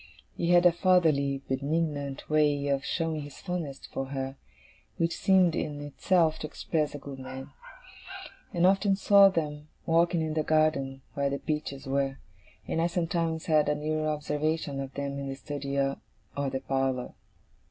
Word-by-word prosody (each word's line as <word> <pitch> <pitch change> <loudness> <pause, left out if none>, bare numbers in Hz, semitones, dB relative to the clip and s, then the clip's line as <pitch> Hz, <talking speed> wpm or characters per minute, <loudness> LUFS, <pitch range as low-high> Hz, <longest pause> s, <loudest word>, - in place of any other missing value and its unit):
He 170 - -1
had 175 0 +6
a 175 - +8
fatherly, 155 -7 +2
benignant 140 0 -2
way 145 -2 +2
of 140 -1 +1
showing 165 -2 -1
his 145 -1 -9
fondness 170 -7 -5
for 135 - -4
her, 135 0 -4 0.6
which 165 0 0
seemed 185 -4 +4
in 145 -1 -3
itself 160 +3 +1
to 155 - -4
express 155 -1 -2
a - - -3
good 140 -1 -9
man. 130 0 -8 1.0
I 175 -4 -2
often 195 +1 +4
saw 200 0 +7
them 150 -4 -3 0.2
walking 170 0 +3
in 155 -1 -2
the 155 - +1
garden 150 -4 +1
where 140 -1 0
the 140 - -2
peaches 150 -2 -4
were, 135 0 0 0.5
and 165 - 0
I 170 - +3
sometimes 165 -2 -1
had 155 -2 +3
a 150 - +2
nearer 155 +1 -1
observation 150 -1 -1
of 135 -1 -5
them 140 0 -3
in 140 -1 -4
the 135 - -4
study 140 0 -5
or 135 0 +1 0.4
the 135 -2 -2
parlour. 135 -2 -1
150 Hz, 165 wpm, -28 LUFS, 140-165 Hz, 1.0 s, a